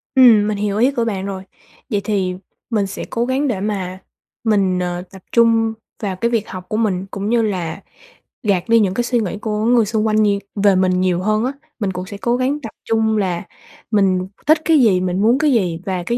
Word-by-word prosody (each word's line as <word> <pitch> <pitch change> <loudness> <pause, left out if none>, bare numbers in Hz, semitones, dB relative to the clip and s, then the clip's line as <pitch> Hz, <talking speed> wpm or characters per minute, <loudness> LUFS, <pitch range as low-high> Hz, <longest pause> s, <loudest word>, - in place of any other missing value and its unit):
Ừm, 230 -5 +7
mình 210 -1 -1
hiểu 205 0 -1
ý 250 +5 +4
của 235 -4 -1
bạn 195 -4 -2
rồi, 190 -1 -5 0.5
vậy 205 -3 0
thì 190 -4 -1 0.3
mình 205 -4 0
sẽ 195 - -6
cố 235 0 -1
gắng 265 +3 0
để 215 -7 -1
mà 190 -3 -3 0.4
mình, 195 -5 +2
ờ, 175 0 -2
tập 190 -1 -12
trung 230 -1 +3 0.3
vào 195 -2 -1
cái 235 +6 -1
việc 225 -3 0
học 185 -1 -7
của 215 - -1
mình 195 -4 0
cũng 200 +1 -3
như 235 -1 +3
là 185 -4 -2 0.6
gạt 200 -1 0
đi 230 0 +6
những 190 -3 +2
cái 240 - 0
suy 240 0 +1
nghĩ 205 -1 -3
của 215 -1 -1
người 235 -2 +4
xung 220 +1 0
quanh 215 0 +3
nhiều 200 -1 +2 0.2
về 200 -2 +5
mình 185 0 +2
nhiều 180 -1 +1
hơn 215 +3 +1
á. 260 - 0 0.3
Mình 200 -3 -1
cũng 180 +1 -5
sẽ 200 +1 -8
cố 235 +3 0
gắng 270 +4 0
tập 225 - -6 0.2
trung 220 -1 +1
là 180 -4 -1 0.5
mình 190 -3 +2 0.2
thích 310 0 +5
cái 320 -3 +5
gì, 200 -7 +4
mình 185 +1 -1
muốn 235 +4 +4
cái 305 -1 +3
gì 180 -9 +1
và 185 -2 -2
cái 235 +7 -1
210 Hz, 230 wpm, -19 LUFS, 185-230 Hz, 0.6 s, Ừm